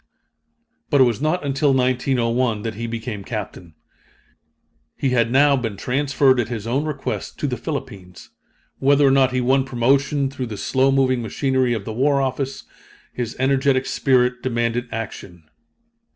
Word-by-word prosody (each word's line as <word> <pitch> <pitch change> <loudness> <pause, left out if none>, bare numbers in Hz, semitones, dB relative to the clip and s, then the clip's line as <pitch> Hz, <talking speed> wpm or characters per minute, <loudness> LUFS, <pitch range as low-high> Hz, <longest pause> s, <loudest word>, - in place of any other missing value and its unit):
But 140 - +3
it - - +8
was 120 -1 0
not 155 +2 0
until 140 0 +1
1901 125 -3 0
that 115 -1 -3
he 115 +3 -5
became 115 -3 -5
Captain. 95 -6 -7 1.2
He 135 - 0
had 115 -2 +2
now 140 +2 +5
been 115 -6 -3
transferred 135 +2 +2
at 115 - 0
his 115 -3 -5
own 135 +6 -1
request 150 -3 -4
to - - -3
the - - -1
Philippines. 90 -2 -7 0.5
Whether 140 +1 +4
or 135 - +5
not 135 -1 +4
he 130 0 0
won 130 +2 +2
promotion 135 +2 +1
through 130 -2 -5
the 105 -2 -7
slow 135 +4 +1
moving 130 -2 +2
machinery 130 +2 0
of 105 -3 -5
the 110 - -5
war 140 +4 +2
office, 135 0 -3 0.5
his 120 -2 -4
energetic 135 0 +2
spirit 125 -2 +1
demanded 120 0 -1
action. 100 -6 -7
130 Hz, 155 wpm, -21 LUFS, 115-135 Hz, 1.2 s, it